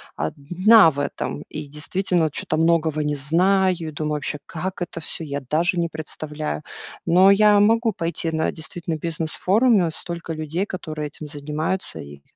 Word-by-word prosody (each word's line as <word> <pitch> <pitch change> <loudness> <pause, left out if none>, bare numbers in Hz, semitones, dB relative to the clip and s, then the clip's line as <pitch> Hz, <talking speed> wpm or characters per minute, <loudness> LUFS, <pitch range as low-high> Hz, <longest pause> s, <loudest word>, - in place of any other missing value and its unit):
1 175 - +4
в 140 - -6
этом. 150 - -5
И 155 -1 -6
действительно 165 +3 0
чё-то 155 - -1
многого 160 -1 +2
не 150 0 -1
знаю. 185 +6 +3
И 160 -2 -5
думаю, 150 0 -2
вообще, 150 0 -4
как 185 +3 -5
это 175 -1 -4
все, 165 - -4
я 140 -2 -3
даже 165 +7 0
не 170 - +1
представляю. 155 - -5 0.4
Но 185 +3 +6
я 210 +1 +5
могу 225 +1 +3
пойти 170 -1 -2
на 160 0 0
действительно 165 0 -5
бизнес-форуме, 175 - +1
столько 170 +1 -5
людей, 155 +4 -2
которые 155 -6 -5
этим 150 +1 -9
занимаются 150 +5 -3
и, 70 0 -10
165 Hz, 155 wpm, -22 LUFS, 150-185 Hz, 0.4 s, Но